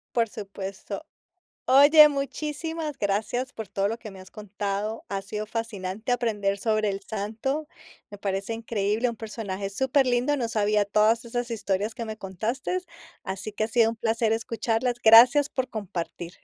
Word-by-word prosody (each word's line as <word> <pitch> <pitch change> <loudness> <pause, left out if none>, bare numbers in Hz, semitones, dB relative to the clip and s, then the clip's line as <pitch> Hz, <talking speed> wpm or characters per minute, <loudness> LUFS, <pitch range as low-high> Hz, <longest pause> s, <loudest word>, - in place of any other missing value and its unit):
Por 230 -2 +3
supuesto. 195 -2 -7 0.6
Oye, 290 +4 +8
muchísimas 300 +2 -4
gracias, 215 +6 -1
por 220 -4 -7
todo 195 0 0
lo 225 +3 -2
que 215 -3 -9
me 190 - -12
has 185 0 -13
contado. 210 +1 -4
Ha 195 -1 -3
sido 210 +2 -5
fascinante, 215 -1 -4
aprender 210 -5 0
sobre 215 0 +1
el 195 0 -2
Santo. 225 +9 -3 0.4
Me 205 - -9
parece 195 +2 -2
increíble, 225 +1 -1
un 235 - -5
personaje 205 -3 -5
súper 265 +5 +2
lindo. 250 +4 +2
No 235 -4 -1
sabía, 210 -1 +2
todas 215 +3 +2
esas 240 +1 -3
historias 205 -1 -1
que 235 -2 -5
me 220 -1 -6
contaste, 225 - -3 0.4
así 195 +3 -5
que 215 - -1
ha - - -3
sido 225 -1 +3
un 230 - -7
placer 225 0 +1
escucharlas. 230 +1 -1
Gracias 245 +6 +8
por 260 -1 -2
compartir. 175 -5 -5
220 Hz, 160 wpm, -26 LUFS, 200-245 Hz, 0.6 s, Oye